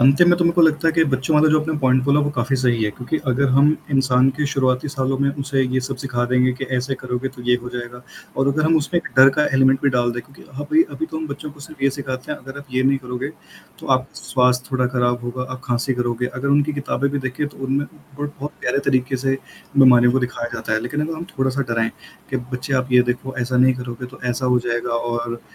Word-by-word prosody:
अंत 135 +5 +5
में 175 0 +5
तो 175 - +2
मेरे 170 - +3
को 170 0 +3
लगता 160 0 +3
है - - +2
कि 165 0 +3
बच्चों 130 +3 0
वाला 155 +1 +5
जो 155 0 +4
अपने 155 0 -2
पॉइंट 130 -2 +3
बोला, 140 +1 +3
वो 145 0 0
काफ़ी 125 +3 +1
सही 120 -3 +1
है, 105 - 0
क्योंकि 125 +8 -3
अगर 140 +2 +2
हम 140 +3 +5 0.2
इंसान 130 -1 +3
के 150 -1 0
शुरुआती 130 +1 +1
सालों 135 -2 -1
में 140 0 +2
उसे 140 -1 -2
ये 130 0 0
सब 135 +1 -4
सिखा 125 -2 -2
देंगे, 125 0 +3
कि 130 +2 -5
ऐसे 130 +2 -1
करोगे 125 +1 -2
तो 120 - -9
ये 125 - +6
हो 120 - -6
जाएगा 120 0 -6 0.4
और 135 +1 +2
अगर 155 +2 +1
हम 160 +1 +4
उसमें 160 +3 0
एक - - -8
डर 135 +1 +10
का 150 - +4
एलिमेंट 135 0 +4
भी 140 - +3
डाल 120 -1 +1
दें, 120 - -4
क्योंकि 135 - -18
ह 145 +2 -5
अभी 315 - +4
अभी 320 - -4
तो 320 - -7
हम 315 0 -4
बच्चों 150 - -6
को 145 0 -16
सिर्फ़ 145 -1 -11
ये 140 - +4
सिखाते 135 0 -6
हैं, - - -6
अगर 135 +2 -10
आप 140 - -11
ये 130 0 +1
नहीं 135 +1 +3
करोगे, 125 +1 -5 0.5
तो - - -10
आप 130 0 +3
स्वास्थ्य 125 -1 +1
थोड़ा 130 -1 +1
खराब 120 -1 0
होगा, 125 +1 -4
आप 130 - -7
खाँसी 125 +2 0
करोगे। 120 0 -1
अगर 130 +2 -4
उनकी 145 +2 +3
किताबें 140 -1 -1
भी 140 - -2
देखें, 130 +2 -3
तो - - -18
उनमें 135 +2 0 0.3
बट 145 0 -2
बहुत 145 +2 -4
प्यारे 125 - 0
तरीके 130 -1 +1
से 135 +1 0 0.4
मनमानियों 125 -1 +6
दिखाया 125 -1 -3
जाता - - -4
है, 110 - +2
लेकिन 145 +6 -2
अगर 165 - -4
हम 165 - -6
थोड़ा-सा 130 +1 0
डराएँ, 115 -1 +1 0.4
कि, 130 - 0
"बच्चे 125 +2 -4
आप 130 0 0
ये 125 0 +7
देखो 125 +2 -3
ऐसा 125 +1 -1
नहीं 130 +1 +5
करोगे 125 0 -6
तो 130 +1 -14
ऐसा 125 +1 -1
हो 125 0 +4
जाएगा 120 0 -2
और 120 0 -2
130 Hz, 255 wpm, -21 LUFS, 125-140 Hz, 0.5 s, डर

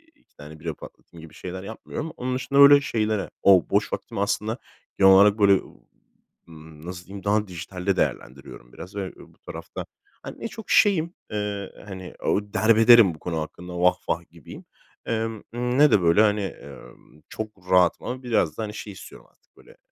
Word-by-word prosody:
2 - - -36
tane 75 +1 -12
bira 80 +1 -4
patlatayım 80 +2 -14
gibi 80 - -13
şeyler 95 +1 -7
yapmıyorum. 115 +9 -7
Onun 125 +1 -2
dışında 140 +2 0
öyle 140 0 +9
şeylere 110 -5 -1
o 95 -3 +5
boş - - 0
vaktim - - -6
aslında 105 +3 -1 0.4
genel 95 -1 +7
olarak 100 +2 +6
böyle, 100 -1 +6 0.9
ımm, 80 -1 -14
nasıl 90 0 -8
diyeyim, 100 0 -9
daha 105 +1 +1
dijitalde 90 +2 -3
değerlendiriyorum 60 -2 -4
biraz 95 +3 -11
ve 95 -2 -4
bu - - -17
tarafta, - - -8 0.4
hani, - - -9
ne - - -4
çok 225 -2 -11
şeyim, 175 -5 +3 0.2
eee, 105 -2 -4
hani, 95 -3 -9
ooo, 105 0 -1
derbederim 115 -3 +6
bu - - -17
konu 80 -1 -3
hakkında, 90 +3 -8
vah 90 +1 +4
vah, - - -2
gibiyim, - - -13 0.4
eee, - - 0
ımm, 115 -2 -6 0.4
ne 150 0 +6
de 100 - +4
böyle, 85 +4 +4
hani, 105 -2 +2 0.2
ımm, 75 - -15
çok 105 -4 -8
rahatım 90 -2 +3
ama 130 +1 -5
biraz 100 -11 0
da, - - -3
hani, 105 -1 -6
şey 105 -1 -8
istiyorum 95 - -13
artık - - -41
böyle. - - -19
100 Hz, 180 wpm, -24 LUFS, 90-110 Hz, 0.9 s, öyle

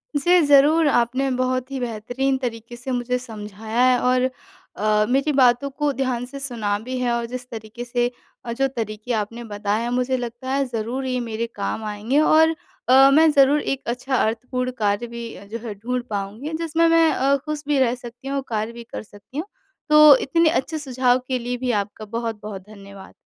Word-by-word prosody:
जी, 350 +5 +4
ज़रूर 290 +3 +5
आपने 255 +1 +1
बहुत 255 +1 -1
ही 270 - -3
बेहतरीन 245 +3 -1
तरीके 235 -2 -5
से 245 +2 -6
मुझे 250 0 -1
समझाया 220 -1 -5
है 250 - +3
और 255 +1 +2 0.5
अ, 210 0 +2
मेरी 275 +4 +2
बातों 260 0 +4
को 290 +1 -1
ध्यान 255 -3 -2
से 275 +2 -9
सुना 230 -7 -2
भी 255 +4 -5
है 245 -1 0
और 235 0 -1
जिस 250 +1 -7
तरीके 220 +1 -8
से 245 0 0 0.3
अ, 235 - -4
जो 270 +3 +1
तरीके 225 -2 -4
आपने 230 +2 -3
बताए 210 0 -2
हैं 240 - -2
मुझे 250 +1 0
लगता 240 +1 -6
है 275 +1 +2
ज़रूर 240 +2 -3
ये 255 -1 -1
मेरे 230 -1 -3
काम 220 - -3
आएँगे 215 +6 0
और 320 +1 +4 0.3
अ, 270 +1 +8
मैं 320 +2 +6
ज़रूर 285 +1 +4
एक 270 0 -2
अच्छा 250 +2 -2
अर्थपूर्ण 250 +2 -1
कार्य 210 +2 0
भी 235 0 -7
अ, 200 - -12
जो 215 +3 -6
है 210 - -4
ढूँढ 245 +5 -3
पाऊँगी 210 +9 -4
जिसमें 330 +1 +2
मैं 330 -1 +5
अ, 275 +1 +2
खुश 305 -1 -4
भी 290 -2 +2
रह 250 -2 +2
सकती 245 +1 -11
हूँ 275 - -2
और 275 - -2
कार्य 220 0 -2
भी 235 0 -10
कर 230 - -8
सकती 210 +5 -14
हूँ। 315 - -2 0.4
तो 300 -1 +9
इतने 330 +3 +3
अच्छे 315 0 -1
सुझाव 255 -3 +1
के 260 -1 0
लिए 245 +1 -3
भी 250 0 -1
आपका 205 +2 -9
बहुत-बहुत 215 -3 -5
धन्यवाद। 200 -2 -12
245 Hz, 200 wpm, -22 LUFS, 225-270 Hz, 0.5 s, तो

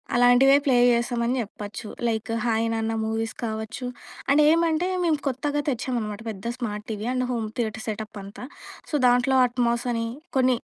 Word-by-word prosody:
అలాంటివే 245 +3 +6
ప్లే 265 - +4 0.2
జేశామని 235 +1 0
జెప్పొచ్చు. 210 0 -7 0.2
Like 225 0 -2
'hi 225 -1 +1
నాన్న' 225 0 -1
మూవీస్ 225 +1 -2
కావచ్చు. 220 +3 -4 0.5
అండేమంటే, 320 +3 +4 0.2
మేము 320 -3 +2
కొత్తగా 290 +3 -1
తెచ్చామనమాట, 230 -5 -2
పెద్ద 195 -2 -8
smart 210 -4 -4
TV 215 +1 -4
and 255 0 0
home 230 -2 -1
theatre 220 -2 -2
setup 215 0 -5
అంతా. 200 +5 -9 0.5
సో, - - -17
దాంట్లో 245 +2 +3
అట్మాసని, 240 -1 0 0.3
కొన్ని 255 -1 +4
235 Hz, 140 wpm, -25 LUFS, 220-255 Hz, 0.5 s, అలాంటివే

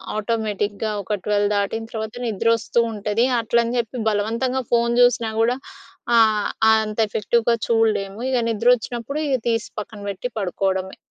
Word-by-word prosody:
ఆటోమేటిక్‌గా 215 -1 -2
ఒక, 205 +2 -2
12 205 -1 +2
దాటిన 205 +3 -1
తర్వాత 220 0 -5
నిద్ర 220 0 -2
వస్తూంటది. 225 -1 0 0.2
అట్లని 235 +1 +1
చెప్పి 235 +2 -4
బలవంతంగా 230 +5 -1
ఫోన్ 235 0 +2
జూసినా 235 -2 +3
కూడా 240 +2 +2 0.6
ఆహ్, 215 -2 +3 0.2
అంత 220 -1 +1
ఎఫెక్టివ్‍గా 230 +3 +1
చూడలేము. 220 -3 +1
ఇగ 260 - +1
నిద్ర 230 +1 -1
వచ్చినప్పుడు 245 +4 -5
ఇగ 275 - +2
తీసి 225 -1 -1
పక్కన 210 0 -10
పెట్టి 200 +5 -4
పడుకోవడమే. 190 0 -2
220 Hz, 135 wpm, -22 LUFS, 205-235 Hz, 0.6 s, జూసినా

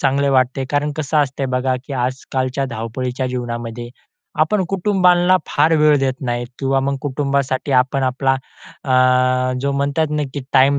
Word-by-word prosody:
चांगलं 140 +1 +2
वाटत 130 0 +2
आहे, 135 - -1
कारण 145 +1 0
कसं 155 0 -2
असतंय 140 -1 0
बघा 130 0 +1
की 140 - -7
आजकालच्या 130 +1 -2
धावपळीच्या 125 +3 -3
जीवनामध्ये, 120 -1 -5 0.5
आपण 190 +4 +2
कुटुंबांना 185 -2 +3
फार 155 +3 +2
वेळ 150 -1 +5
देत 135 -1 0
नाही 120 -2 -2
किंवा 135 0 +1
मग 140 +1 -1
कुटुंबासाठी 140 -1 -1
आपण 130 +1 +2
आपला 135 +1 +1 0.5
अ, 130 -1 +3
जो 140 0 -1
म्हणतात 140 +2 0
ना 150 0 0
की 145 - -3
टाईम 140 +1 +4
135 Hz, 155 wpm, -19 LUFS, 130-145 Hz, 0.5 s, वेळ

